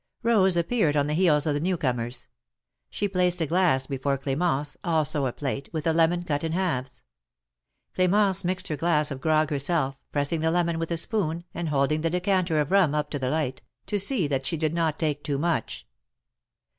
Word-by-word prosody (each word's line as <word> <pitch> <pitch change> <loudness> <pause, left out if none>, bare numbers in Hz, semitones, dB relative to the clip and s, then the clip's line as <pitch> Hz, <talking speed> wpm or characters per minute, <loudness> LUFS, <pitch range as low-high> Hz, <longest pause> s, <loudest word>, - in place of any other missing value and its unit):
Rose 195 -6 +3
appeared 170 -4 +1
on 145 - +2
the 150 - -2
heels 155 -4 +3
of 150 - +1
the 145 - -1
new 180 +3 0
comers. 120 -3 -3 0.6
She 205 - -2
placed 180 -2 +1
a 165 - +1
glass 160 -5 +2
before 135 0 -1
Clemence, 145 +1 -1
also 155 -5 +1
a - - -2
plate, 140 +1 -4
with 155 -2 -3
a 165 - +2
lemon 170 +2 +2
cut 150 -3 -2
in 160 0 -2
halves. 135 -9 -2 0.9
Cl4mence 190 +1 +2
mixed 185 +1 -1
her 155 - -1
glass 150 -1 +1
of 135 -1 -6
grog 155 0 +2
herself, 140 -1 0
pressing 145 +3 0
the 160 - +2
lemon 170 -1 0
with 165 - -3
a 170 - -1
spoon, 170 -3 -1
and 170 -2 -3
holding 150 +2 +1
the 165 - 0
decan 180 +1 +1
ter 160 -3 +1
of 150 +2 -1
rum 185 -7 +4
up 150 -1 -2
to 145 - -2
the 130 -1 -1
light, 140 -4 -2 0.2
to 205 - 0
see 200 - +3
that 135 -2 -1
she 160 +5 0
did 155 0 0
not 165 -2 0
take 150 -2 -2
too 145 -2 -2
much. 140 - -2
160 Hz, 205 wpm, -26 LUFS, 145-175 Hz, 0.9 s, rum